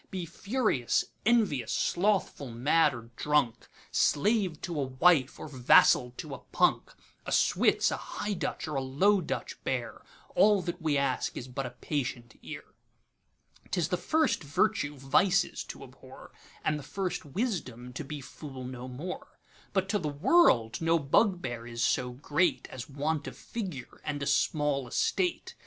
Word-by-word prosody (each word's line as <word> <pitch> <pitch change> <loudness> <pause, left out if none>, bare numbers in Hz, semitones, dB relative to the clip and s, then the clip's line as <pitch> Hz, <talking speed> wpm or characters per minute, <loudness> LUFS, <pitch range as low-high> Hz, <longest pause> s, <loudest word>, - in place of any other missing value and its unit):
Be 185 -4 -4
furious, 195 - 0 0.2
envious, 195 - +2
slothful, 185 -7 0
mad, 145 +5 +3
or 115 0 -10
drunk, 150 -6 +1 0.2
Slave 190 0 +2
to 170 -4 -3
a - - 0
wife, 130 +1 +3
or - - -6
vassal 125 -2 +5
to - - -6
a - - -6
punk,A - - -1
Switz, - - +3
a - - -1
High 205 0 -4
Dutch 175 - -3
or 155 - -4
a 135 - 0
Low 185 +10 +3
Dutch - - -5
bear; 120 -3 -3 0.3
All 205 -2 +4
that 175 0 -4
we 155 -3 +1
ask 135 -2 -1
is 125 - -6
but 130 +1 -4
a 125 0 -12
patient 125 -5 -3
ear.'T - - -12
is 165 -1 0
the 180 - +1
first 315 - +1
virtue 150 0 0
vices 175 +9 +2
to - - -9
abhor, - - -14 0.3
And 150 -1 +1
the - - -9
first 185 0 -3
wisdom 145 - -3
to 155 - -5
be 145 +1 -6
fool 135 -1 -9
no 125 0 -7
more:But 180 +6 -6
to 205 0 +1
the 155 -4 -2
world 145 - +3
no 165 +1 +3
bugbear 140 - +1
is 115 -1 -3
so 125 -1 +1
greatAs 145 -2 -1
want 145 +2 -2
of - - -8
figure 180 - -7
and 145 -1 -3
a - - -2
small 140 -1 +1
Estate. 355 - 0
150 Hz, 150 wpm, -29 LUFS, 130-185 Hz, 0.3 s, vassal